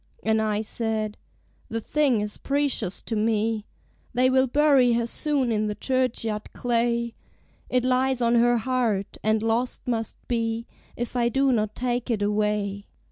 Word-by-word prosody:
And 220 0 +2
I 215 -1 0
said 220 -1 -2 0.5
"The 225 - -2
thing 265 -2 +1
is 210 0 -4
precious 275 -9 0
to 225 - -3
me: 220 0 0 0.5
They 255 +1 +4
will 260 0 +4
bury 275 -2 +4
her 235 0 +1
soon 275 0 0
in 215 -1 +1
the 210 - -3
churchyard 230 -3 -1
clay; 235 -1 0 0.6
It 250 -1 +1
lies 255 0 +2
on 235 -1 +2
her 240 0 +4
heart, 225 -4 -1
and 215 0 +2
lost 230 +3 -1
must 225 -3 -2
be 230 -1 -1 0.3
If 240 +1 -4
I 235 -1 +2
do 270 +3 +2
not 215 -2 0
take 245 0 -2
it 215 -4 0
away." 205 -1 -1
230 Hz, 155 wpm, -25 LUFS, 215-250 Hz, 0.6 s, They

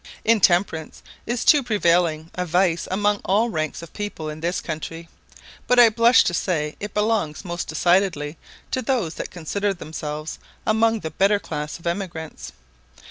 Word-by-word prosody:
Intemperance 180 -7 +2 0.2
is 240 +1 -1
too 295 - +6
prevailing 170 -8 +1
a 180 - -2
vice 175 0 +1
among 205 +2 +1
all 215 +5 +2
ranks 155 -2 -3
of 170 - -12
people 205 -7 -5
in 155 0 -7
this 170 +3 -1
country; 165 +1 -6 0.6
but 250 - +3
I 240 -2 +9
blush 230 +3 +5
to 175 - -1
say 155 -4 -1
it 205 0 -6
belongs 210 -6 0
most 175 -1 -4
decidedly 170 -2 +1 0.4
to 260 - 0
those 230 -10 0
that - - -5
consider 195 +4 -2
themselves 155 -2 -6 0.3
among 225 0 +2
the 160 - -5
better 195 +6 +3
class 150 -5 -5
of 170 - -19
emigrants. 170 -3 -4
175 Hz, 155 wpm, -23 LUFS, 160-210 Hz, 0.6 s, I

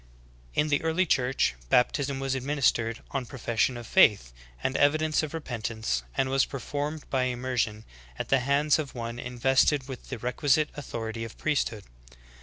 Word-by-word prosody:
In 150 - +2
the 145 - +2
early 165 +3 +1
Church, 130 - +1 0.2
baptism 135 +2 +2
was 135 -1 -1
administered 130 -4 0
on 135 -3 -3
profession 120 0 0
of 120 - -8
faith 100 - +4 0.3
and 130 - 0
evidence 155 +2 +3
of 155 -2 -4
repentance, 110 - -3 0.2
and 135 - +2
was 135 0 +3
performed 145 +3 -4
by 130 -1 +2
immersion^ 120 -4 -2 0.3
at - - -4
the 135 - +4
hands 140 +4 +2
of 145 -4 -5
one 115 0 -5
invested 130 +3 +2
with 130 -2 -8
the 130 - -4
requisite 140 +5 +1
authority 115 -5 -5
of 115 - -8
priesthood. 130 -8 -1
130 Hz, 155 wpm, -28 LUFS, 120-145 Hz, 0.3 s, faith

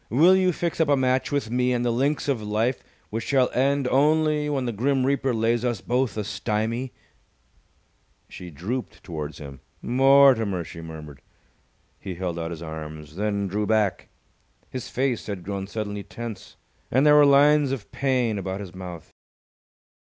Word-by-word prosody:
Will 165 +10 +5
you 185 -1 +3
fix 170 0 -2
up 160 - +3
a 145 - +4
match 130 0 +1
with 140 -6 -1
me 125 0 +1
on 120 - -1
the 120 - +1
links 140 +6 0
of 135 -6 0
life 110 +4 -1 0.3
which 115 +2 -3
shall 130 -3 +2
end 140 +1 +1
only 150 +1 +2
when 135 -3 -1
the 120 - -1
Grim 130 +4 0
Reaper 135 -1 +1
lays 115 +1 +1
us 120 -4 -1
both 125 -1 -1
a 105 - -1
stymie?" 115 +5 -2 1.4
She 90 - -10
drooped 105 - -5
towards 75 -5 -6
him. 70 -2 -10 0.2
"Mortimer!" 130 -7 +4
she 85 0 -10
murmured. 75 -4 -10 0.8
He 95 -2 -6
held 85 -1 -3
out 80 0 -3
his 85 -1 -7
arms, 80 -1 -8
then 100 0 -1
drew 105 +2 -2
back. 105 -3 0 0.6
His 130 -2 -6
face 130 -2 -1
had 100 -4 -5
grown 95 0 -4
suddenly 105 -1 -4
tense, 115 -1 -8 0.3
and 130 +4 +3
there 150 - +7
were 150 - +7
lines 145 0 +5
of 125 -7 -5
pain 125 -6 0
about 95 0 -4
his 95 -4 -8
mouth. 90 -3 -9
115 Hz, 165 wpm, -24 LUFS, 95-135 Hz, 1.4 s, there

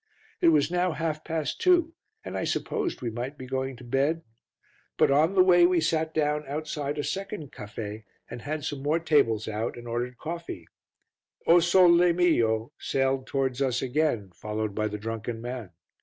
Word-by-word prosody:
It - - +4
was 155 -1 +4
now 180 -1 +1
half 155 -1 -3
past 160 -4 -3
two 345 -3 +4 0.3
and - - -6
I - - -1
supposed 420 - -2
we 120 - -2
might 125 +5 -5
be 130 - -8
going 130 +1 -3
to 125 - -13
bed, 140 +7 0 0.7
but - - +4
on 155 +7 +3
the 185 - +7
way 175 -1 +6
we 180 -1 +2
sat 160 0 0
down 150 -1 0
outside 150 0 -3
a 145 - -1
second 195 -6 -4
caffe, 105 0 -7 0.2
had 145 +5 -5
some 145 -3 -4
more 150 +3 +1
tables 140 -10 +2
out 110 +2 -3
and 120 0 -9
ordered 120 +1 -3
coffee. 165 - -6 0.8
O 170 +1 +7
Sole 175 0 +5
Mio! 120 -10 +2
sailed 135 -1 0
towards 135 -1 -1
us 130 -2 +1
again, 130 -7 0
followed 105 +3 -4
by 110 +1 0
the 105 0 -4
drunken 115 +1 -4
man. 120 -3 -6
140 Hz, 170 wpm, -27 LUFS, 120-165 Hz, 0.8 s, the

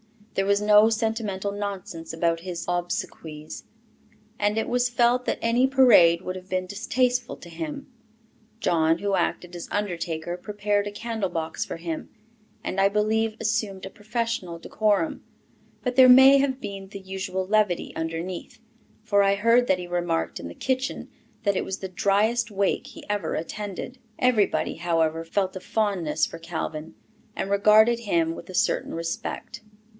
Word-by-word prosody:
There 195 - 0
was 200 0 +3
no 210 +1 +6
sentimental 220 -3 -1
nonsense 200 -5 -5
about 165 0 0
his 175 0 -6
obsequies; 165 -3 -4 0.7
it 210 +2 +1
was 245 0 +1
felt 245 +1 +2
that - - 0
any 240 +3 +3
parade 245 -11 +6
would 185 - -4
have 185 0 -10
been 185 0 -1
distasteful 245 +6 0
to 170 - -13
him. 280 - -6 0.7
John, 165 -5 +2
who 200 +1 -1
acted 180 -2 -1
as 170 - -7
undertaker, 175 -4 -3
prepared 205 +1 -1
a - - -4
candle 220 -2 -3
box 165 -2 -3
for - - -6
him, 165 -1 -5 0.5
and 195 - -1
I 195 - +5
believe 215 +2 +1
assumed 215 -4 -1
a - - -6
professional 220 -5 -3
decorum; 215 - 0 0.6
but 250 0 -2
there 260 -1 +9
may 265 +2 +9
have 270 -1 0
been 195 -3 -7
the 200 0 -9
usual 190 0 -4
levity 205 -3 +1
underneath, 165 +5 -5 0.4
for 205 -2 +3
I 200 0 +3
heard 230 +4 +3
that 185 - +2
he 180 - -5
remarked 175 -2 -1
in 85 - -6
the 85 - -9
kitchen 260 +1 -2 0.3
that 200 -3 +1
it - - -1
was 190 - -4
the 190 - -6
"dryest 210 +5 +1
wake 200 -1 0
he - - -12
ever 205 -5 -2
attended." 205 +8 -5 0.2
Everybody, 235 -10 +1
however, 165 -1 0
felt 190 +3 -1
a - - -4
fondness 195 -7 0
for 165 - -9
Calvin, 160 -2 -5 0.4
and 195 - -3
regarded 215 +3 +5
him 170 -7 0
with - - -10
a 185 - -7
certain - - 0
respect. 165 0 -5
200 Hz, 160 wpm, -25 LUFS, 175-225 Hz, 0.7 s, there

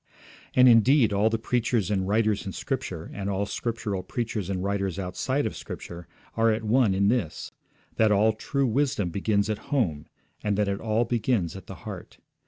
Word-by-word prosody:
And, 125 0 +7
indeed, 120 0 +5
all 105 +2 +3
the 115 - 0
preachers 115 -3 0
and 95 -2 0
writers 105 0 +1
in 95 - -6
Scripture, 105 - -4
and 100 0 -4
all 100 +1 0
Scriptural 105 -3 -3
preachers 110 -3 -3
and 95 -1 -2
writers 100 -2 -1
outside 130 +9 -1
of - - -3
Scripture, 85 -1 -8 0.3
are 115 0 +3
at 110 +1 -1
one 110 -2 +3
in 100 +1 +2
this: 105 -8 -1 0.5
that 110 -1 +4
all 105 +2 +4
true 140 +5 -1
wisdom 125 -6 0
begins 100 +2 +1
at 110 -1 -2
home, 90 - 0 0.4
and 105 -2 0
that 105 -1 +1
it 100 0 -1
all 110 +1 +1
begins 115 -6 0
at 95 - -10
the - - -8
heart. - - -8
105 Hz, 185 wpm, -26 LUFS, 100-115 Hz, 0.5 s, And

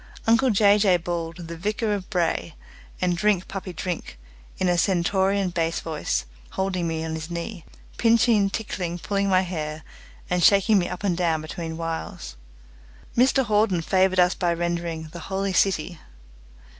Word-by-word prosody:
Uncle 230 +4 +4
Jay 205 -1 +5
Jay 195 -3 +4
bawled 165 -1 -4
"The 170 - -6
Vicar 210 +5 -1
of 195 -3 -4
Bray" 170 -4 -1 0.4
and 180 -1 +1
"Drink, 190 0 +1
Puppy, 195 -1 -6
Drink" 175 - -5 0.4
in 185 - 0
a 175 - +3
stentorian 190 +2 +1
bass 165 -1 -1
voice, 155 - -2 0.3
holding 185 -3 -1
me 160 0 -2
on 160 - -4
his 160 +1 -5
knee, 170 +1 -5 0.3
pinching, 230 -3 +4
tickling, 185 -5 -4
pulling 200 +5 -1
my 185 -1 +4
hair, 155 -4 -4 0.4
and 180 -1 0
shaking 200 +2 +5
me 175 - -1
up 180 +2 -6
and 190 -4 +1
down 170 -2 +1
between 160 +1 -6
whiles. 165 - -5 0.8
Mr 260 +2 +3
Hawden 210 -5 +2
favoured 185 +1 +2
us 180 0 +5
by 175 -1 0
rendering 170 -2 -3
"The 170 - -8
Holy 195 0 -1
City". 175 -3 +1
180 Hz, 155 wpm, -24 LUFS, 170-200 Hz, 0.8 s, Jay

